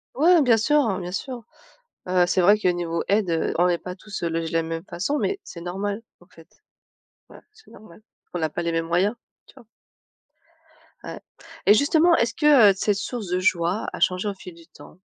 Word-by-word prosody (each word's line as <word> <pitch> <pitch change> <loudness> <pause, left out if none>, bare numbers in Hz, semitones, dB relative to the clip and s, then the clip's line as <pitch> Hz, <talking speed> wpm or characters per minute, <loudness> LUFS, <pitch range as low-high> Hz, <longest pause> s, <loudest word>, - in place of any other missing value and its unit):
Ouais 330 +4 +5
bien 240 -4 +4
sûr, 295 +7 +2
hein, 200 -7 -1
bien 180 0 -6
sûr. 240 +4 -6 0.7
Heu, 180 -1 +3
c'est 185 - +1
vrai 205 +4 +5
que 200 - -3
niveau 170 -1 -2
aide, 200 -3 +1
heu, 165 - -1
on 175 - +4
n'est 175 -1 +1
pas 180 0 -8
tous, 205 0 -9
heu, 170 - 0
logés 165 0 -3
de - - -9
la 165 - +2
même 165 0 -5
façon 280 +12 -2
mais 395 0 -2
c'est 170 - -10
normal 200 +5 -4 0.2
en 175 - -20
fait. 165 +1 -19 0.8
Voilà, - - -16
c'est 445 0 -21
normal. 215 -1 -16 0.3
On 175 - -3
n'a 160 -1 -1
pas 170 - -5
les 170 - -1
mêmes 165 0 -2
moyens. 190 +7 +1 0.3
Tu - - -19
vois? 250 -4 -17 1.4
Ouais - - -8 0.5
et 205 - +7
justement, 320 +7 +3
est-ce 230 0 0
que, 275 -9 +5
heu, - - -1
cette 200 +1 0
source 220 -1 -5
de 180 +1 0
joie 180 +1 0
a - - -7
changé 185 +3 +1
au 200 - -2
fil 180 -2 -12
du 165 0 -18
temps? 180 - -17
190 Hz, 220 wpm, -23 LUFS, 175-230 Hz, 1.4 s, et